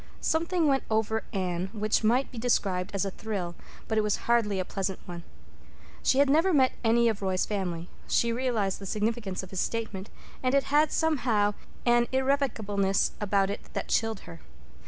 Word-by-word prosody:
Something 335 +1 +1
went 275 -2 +3
over 220 0 0
Anne 185 -3 -2
which 215 0 0
might 245 +5 +2
be 235 - -7
described 195 -6 0
as 200 0 -1
a 195 - -2
thrill, 190 -5 -4 0.3
but 220 -1 +1
it - - +2
was 210 -1 +1
hardly 225 -5 +2
a 185 - -1
pleasant 195 0 -3
one. 175 -1 -7 0.8
She 260 - +2
had 280 +1 +5
never 320 +7 +4
met 265 -5 +4
any 235 +1 +4
of 220 -3 0
Roy's 190 -1 0
family; 180 -5 -3 0.2
she 235 0 +2
realized 230 -6 0
the 195 - -7
significance 210 -2 -2
of 185 - -10
his 190 - -3
statement; 215 -4 -3 0.3
and 255 +1 +1
it 275 - +4
had, 300 +2 +3
somehow, 240 -10 +2 0.3
an 240 0 +4
irrevocableness 225 -8 +1
about 200 -1 +2
it 205 - -7
that - - -4
chilled 225 -2 0
her. 165 -1 -11
220 Hz, 180 wpm, -28 LUFS, 195-250 Hz, 0.8 s, had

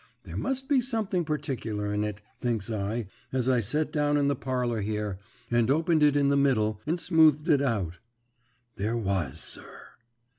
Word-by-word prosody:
There - - -9
must 265 0 0
be 280 -4 +3
something 220 -7 0
particular 120 -9 -3
in 105 0 0
it, 105 -1 -4 0.2
thinks 115 -3 -1
I, 110 +2 -2 0.3
as 130 -1 0
I 130 -2 +4
set 150 +9 -1
down 145 -1 +2
in 140 -1 +2
the 140 - +1
parlour 125 -3 -1
here, 105 -2 -3 0.3
and 120 0 +3
opened 160 +2 +2
it 145 -1 +5
in 140 -1 +3
the 140 - +3
middle, 110 -7 +2
and 170 +3 0
smoothed 160 -3 +4
it 145 -2 +4
out. 100 -11 -1 0.8
There 110 +4 -1
was, 95 - -1
sir. - - -6
125 Hz, 175 wpm, -28 LUFS, 105-150 Hz, 0.8 s, it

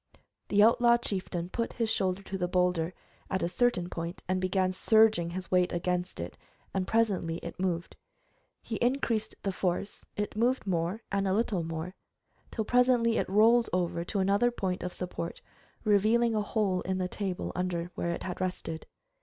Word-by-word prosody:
The 205 0 +5
outlaw 235 +1 +5
chieftain 185 -6 -3
put 230 +4 -2
his 230 -2 0
shoulder 195 -3 0
to 195 - -6
the 180 -2 0
boulder, 180 -1 +1 0.3
at 190 - -1
a - - +2
certain 180 -1 +1
point, 170 0 -5
and 185 0 0
began 185 0 +1
surging 220 -2 +4
his 185 +2 -6
weight 180 -1 +3
against 180 +1 -2
it, 85 +1 -6 0.3
and 190 -1 -1
presently 195 -7 +1
it - - -7
moved. 175 -2 -2 0.7
He 220 - -3
increased 240 -3 0
the 195 - 0
force, 185 +2 -2
it 210 0 -2
moved 245 +3 +1
more 180 +4 -1
and 200 -1 +1
a 190 - +2
little 210 -3 +1
more, 165 +2 -4 0.6
till 220 - -3
presently 245 -1 +3
it - - -2
rolled 225 +4 +5
over 175 -1 0
to 205 - -3
another 200 +5 +3
point 190 -6 -2
of 180 - -3
support, 175 -2 -5 0.4
revealing 220 +3 +3
a 215 - +1
hole 205 -3 0
in 190 +1 -2
the 185 -1 -1
table 190 -1 -3
under 175 -1 -2
where 170 - -2
it 170 - -3
had 185 0 -5
rested. 180 -3 -3
190 Hz, 175 wpm, -30 LUFS, 180-220 Hz, 0.7 s, The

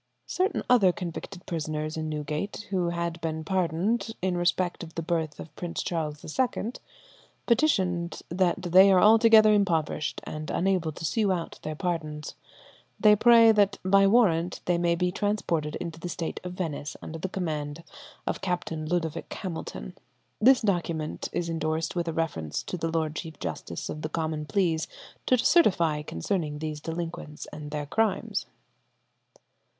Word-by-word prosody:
Certain 375 +3 0
other 210 -7 +5
convicted 175 +1 -7
prisoners 155 -1 -3
in 155 -1 -3
Newgate, 155 +7 -4
who 180 -3 +1
had 170 0 -3
been 160 -1 -3
pardoned 190 +6 0
in 185 -1 0
respect 175 0 0
of 165 -2 -9
the 165 - -3
birth 160 -3 -2
of 155 - -10
Prince 175 -1 -4
Charles 155 -4 -3
II, 240 -3 0 0.7
petitioned 185 - +1
that 175 +1 +1
they 190 +3 +7
are 185 - +6
altogether 220 +1 +7
impoverished, 165 -7 0
and 155 0 -6
unable 180 -3 +1
to 160 - -7
sue 205 +5 +1
out 170 -3 -3
their 155 0 -4
pardons. 155 -3 -3 0.7
They 210 -1 +7
pray 230 +1 +7
that 205 -2 +3
by 195 +1 +5
warrant 180 -6 +3
they 175 -1 +2
may 170 0 +2
be 180 +1 0
transported 175 -7 -1
into 165 -2 -5
the 175 - -5
State 165 -1 -4
of 180 0 -5
Venice 160 -5 -4
under 165 +1 -6
the 190 - -3
command 155 -4 -3 0.4
of - - -2
Captain 165 -4 -2
Ludovic 165 -2 -2
Hamilton. 160 - -6 0.5
This 260 +3 +6
document 170 -7 -1
is 170 - -2
endorsed 160 0 -2
with 170 -1 -1
a 165 - -1
reference 115 - -2
to - - -5
the 165 -2 -2
Lord 160 -1 -1
Chief 160 -2 -6
Justice - - -5
of 150 - -5
the 155 - -3
Common 155 -2 -2
Pleas 170 -5 +1 0.4
to 255 - +5
certify 170 - +3
concerning 150 - -2
these 155 -1 -4
delinquents 165 -2 -5
and 150 -1 -7
their 150 0 -3
crimes. 220 +9 0
170 Hz, 155 wpm, -27 LUFS, 155-190 Hz, 0.7 s, they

